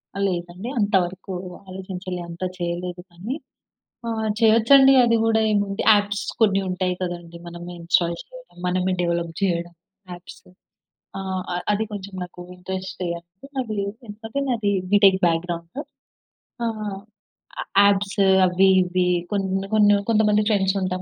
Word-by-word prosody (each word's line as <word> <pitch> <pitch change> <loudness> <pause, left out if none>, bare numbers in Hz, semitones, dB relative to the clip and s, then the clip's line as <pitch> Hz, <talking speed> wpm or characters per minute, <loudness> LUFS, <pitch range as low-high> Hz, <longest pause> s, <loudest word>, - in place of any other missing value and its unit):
ఆ - - -4
లేదండి. 175 +4 -5
అంత 205 0 0
వరకు 190 +2 -8 0.3
ఆలోచించలే 185 -1 -6
అంత 170 +1 -10 0.2
చేయలేదు 175 0 -4
కానీ, 195 +10 -5 0.7
ఆహ్, 220 -1 -1
చేయొచ్చండి 235 +5 +6
అది 230 -1 +3
గూడా 225 -1 +3
ఏముంది 200 0 0
యాప్స్ 205 +1 0 0.2
కొన్ని 200 -3 +4
ఉంటాయి 185 0 -1
కదండీ. 175 -1 -5
మనమే 175 +1 -8
ఇన్‌స్టాల్ 170 0 +1
చేయడం, - - -15
మనమే 185 +1 0
డెవలప్ 170 -1 -1
జేయడం, 175 -3 -1 0.4
యాప్సు. 175 +1 -12 0.7
ఆహ్ 190 -1 -3
అ - - -1 0.2
అది 210 +1 +1
కొంచెం 200 -1 -7
నాకు 180 0 -10
ఇంట్రెస్టే 185 0 -5
అండి. 175 +8 -17
మళ్లీ 215 -6 -2 0.2
ఎందుకంటే 225 +5 -6
నాది 220 -5 0 0.2
బిటెక్ 195 -2 +6
బ్యాక్‌గ్రౌండు. 170 +5 -3 0.9
ఆహ్ 220 -2 -3 0.8
య - - -3 0.2
యాప్సు 200 0 +2 0.2
అవి 185 +1 +3
ఇవి 180 0 0 0.3
కొన్ని 195 -1 -1
కొన్ని 205 -1 +5 0.2
కొంతమంది 210 -1 +3
ఫ్రెండ్స్ 195 -2 +2
ఉంటాం 185 0 -2
190 Hz, 130 wpm, -23 LUFS, 180-210 Hz, 0.9 s, చేయొచ్చండి